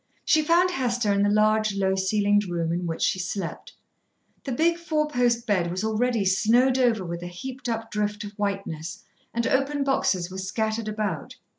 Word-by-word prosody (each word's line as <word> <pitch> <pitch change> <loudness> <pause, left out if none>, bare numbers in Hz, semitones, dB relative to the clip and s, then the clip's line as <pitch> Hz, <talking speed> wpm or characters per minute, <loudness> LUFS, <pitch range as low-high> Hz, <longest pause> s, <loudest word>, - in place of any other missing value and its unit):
She 315 - +4
found 345 +4 +3
Hester 240 - 0
in 200 - +2
the 205 - +3
large, 215 0 +2
low 190 -1 +1
ceilinged 205 +1 +1
room 170 -1 -1
in 175 0 -2
which 165 - -2
she 185 - +1
slept. 185 -1 -5 0.7
The 270 - -3
big 335 +7 +2
four 310 -3 0
post 245 -4 +1
bed 185 -6 +1
was 185 +4 -3
already 220 0 +1
snowed 240 +7 +3
over 230 -6 +2
with 170 0 -5
a 175 - -5
heaped 250 +8 -7
up 225 -1 -3
drift 210 0 -2
of 205 - -7
whiteness, 195 -6 -4 0.3
and 235 0 -1
open 275 +3 +1
boxes 185 -10 0
were 190 - -6
scattered 220 +3 -2
about. 210 -7 -3
215 Hz, 180 wpm, -25 LUFS, 190-245 Hz, 0.7 s, She